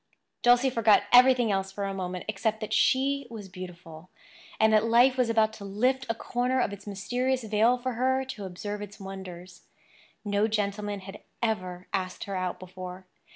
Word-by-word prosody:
Dulcie 245 +2 +5
forgot 225 -3 +4
everything 250 -2 +6
else 195 -1 -1
for 200 +1 -5
a 195 0 -2
moment 180 -1 -4
except 215 +1 -1
that 215 -1 -4
she 275 +2 +2
was 215 -4 -8
beautiful, 180 -2 -10 0.5
and 220 0 +4
that 215 0 +5
life 240 +3 +5
was 250 -3 +1
about 220 -1 +2
to 220 -2 -10
lift 250 +7 0
a 230 - 0
corner 250 +3 -1
of 205 - 0
its 200 +1 -11
mysterious 245 +6 -1
veil 220 +3 +3
for 255 +1 -3
her 260 +2 +1
to 210 -6 -7
observe 205 +3 -5
its 205 +1 -9
wonders. 185 -2 -9 0.6
No 205 +1 +2
gentleman 205 -1 -2
had 195 +2 -10 0.2
ever 185 -5 -2
asked 185 -1 -2
her 195 - -5
out 185 -1 -2
before. 185 0 -9
210 Hz, 175 wpm, -28 LUFS, 190-245 Hz, 0.6 s, everything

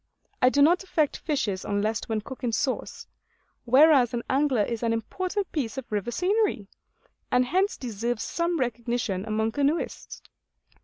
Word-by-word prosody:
I 250 - +6
do 285 +2 +4
not 350 +5 +4
affect 315 -6 0
fishes 215 - -2
unless 205 +1 -1
when 220 -1 -1
cooked 260 +4 -10
in 240 - 0
sauce; 260 +3 -2 0.6
whereas 260 -1 +5
an 235 - -3
angler 265 -5 +2
is 230 +1 -3
an 230 -1 +1
important 370 - -3
piece 265 -5 -3
of 265 - -7
river 210 +1 -1
scenery, 385 - 0 0.7
and 250 0 +3
hence 380 +9 +1
deserves 235 -1 -3
some 340 -1 -1
recognition 235 -5 -2
among 220 +1 0
canoeists. 285 +6 -2
250 Hz, 150 wpm, -26 LUFS, 225-305 Hz, 0.7 s, I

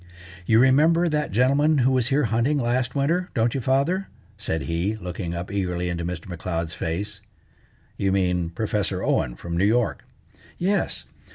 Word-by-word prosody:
"You 110 - +5
remember 155 +8 +5
that 150 -2 0
gentleman 140 +7 +3
who 130 0 +3
was 130 -2 +2
here 140 +2 +2
hunting 120 +6 +1
last 125 0 0
winter, 165 +6 +1
don't 115 -1 +2
you, 135 - -2
father?" 140 +10 +1 0.3
said 80 - -3
he, 85 +6 -1
looking 90 -3 -5
up 85 +2 -5
eagerly 90 -3 -1
into 85 0 -3
Mr. 85 0 -5
M'Leod's 85 -2 -3
face. 100 +5 -4 0.8
"You 95 -1 +1
mean 90 -3 +1
Professor 105 +3 -2
Owen - - 0
from 85 +7 -5
New 90 - +1
York." 115 +2 +1 0.5
"Yes. 195 +3 0
110 Hz, 160 wpm, -24 LUFS, 90-135 Hz, 0.8 s, You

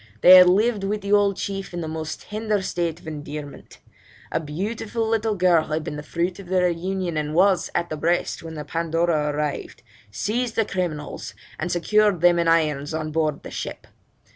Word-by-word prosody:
They 180 - +9
had 180 -1 +8
lived 210 +2 +2
with 205 +2 -1
the 200 +1 -1
old 200 -1 +3
chief 195 -2 -4
in 175 - -3
the 160 - -4
most 155 0 -5
tender 210 -1 -2
state 170 -3 -2
of 180 - -19
endearment; 150 -2 -8 0.5
a - - +1
beautiful 210 +8 -3
little 220 -1 0
girl 180 -4 +3
had 155 +1 -2
been 150 - -5
the 150 - -5
fruit 175 +4 -2
of 195 - -10
their 180 -1 +2
union, 180 0 -2
and 150 0 -2
was 185 0 +3
at 170 - -1
the 155 - -3
breast 170 +3 0
when 165 -1 -8
the 150 -1 -6
Pandora 165 -2 0
arrived, 150 0 -4 0.3
seized 220 - -2
the 225 - +2
criminals, 170 -7 -4 0.2
and 175 +2 -2
secured 205 +1 +2
them 175 -1 +5
in 170 - +1
irons 155 -3 +1
on 155 -1 -3
board 155 -2 -1
the - - -8
ship. - - -6
175 Hz, 190 wpm, -23 LUFS, 155-195 Hz, 0.5 s, They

